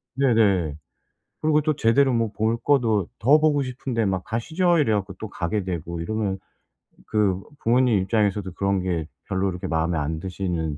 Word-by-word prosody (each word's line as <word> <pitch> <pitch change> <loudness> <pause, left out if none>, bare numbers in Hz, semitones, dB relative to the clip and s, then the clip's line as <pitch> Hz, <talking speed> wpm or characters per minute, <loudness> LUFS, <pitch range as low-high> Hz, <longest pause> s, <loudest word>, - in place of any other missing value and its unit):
네네. 105 - +2 0.7
그리고 155 -1 +3
또 155 0 0
제대로 135 +1 +3
뭐 115 -2 +1
볼 110 +2 0
것도 115 -7 +1
더 135 +8 +5
보고 150 -2 +3
싶은데 125 -3 -2
막 95 -2 -1
"가시죠." 160 - +1
이래 140 -8 +2
갖고 100 -1 -2
또 110 - -5
가게 95 +2 -2
되고 85 -2 -4
이러면 100 +2 -2 0.7
그 100 -3 +1 0.2
부모님 120 -1 +3
입장에서도 100 -1 0
그런 100 0 0
게 85 -4 -2 0.2
별로 95 0 0
그렇게 90 -2 -4
마음에 80 +1 0
안 75 +2 -2
드시는 85 -4 -3
105 Hz, 330 characters per minute, -24 LUFS, 90-120 Hz, 0.7 s, 더